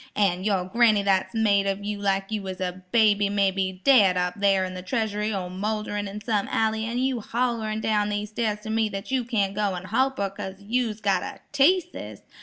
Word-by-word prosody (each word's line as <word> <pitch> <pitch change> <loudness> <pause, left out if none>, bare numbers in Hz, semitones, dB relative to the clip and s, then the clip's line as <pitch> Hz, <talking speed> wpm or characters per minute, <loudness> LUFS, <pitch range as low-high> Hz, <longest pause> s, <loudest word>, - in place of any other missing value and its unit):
"An' 185 -3 +1
your 195 -3 +1
granny 215 0 +3
that's 195 +2 +1
made 200 -3 +3
of 195 +1 -2
you 205 0 -3
like 195 0 -1
you 215 -1 -1
was 190 -1 -6
a 185 0 -4
baby 205 -3 +4
may 200 -1 +2
be 190 -1 -3
daid 205 -10 +6
up 180 0 0
thar 195 -2 +3
in 185 - -6
the 185 - -6
treasury 210 +1 -1
or 190 -3 -3
moulderin' 205 +2 -3
in 200 +2 -6
some 210 -2 0
alley 220 0 0
an' 235 +2 -3
you 260 -1 0
hollerin' 225 -2 -1
down 210 -1 +1
these 210 0 -3
stairs 215 -2 -1
to 220 - -6
me 220 -1 +1
that 195 +4 -6
you 260 -2 +1
can't 210 -5 0
go 200 -2 -1
an' 175 - -6
holp 265 +7 0
her 200 -1 -1
'cause 195 -1 -7
you's 220 +1 -2
got 200 -2 +2
a - - -7
teaseus. 350 +5 +1
205 Hz, 215 wpm, -25 LUFS, 195-220 Hz, -, daid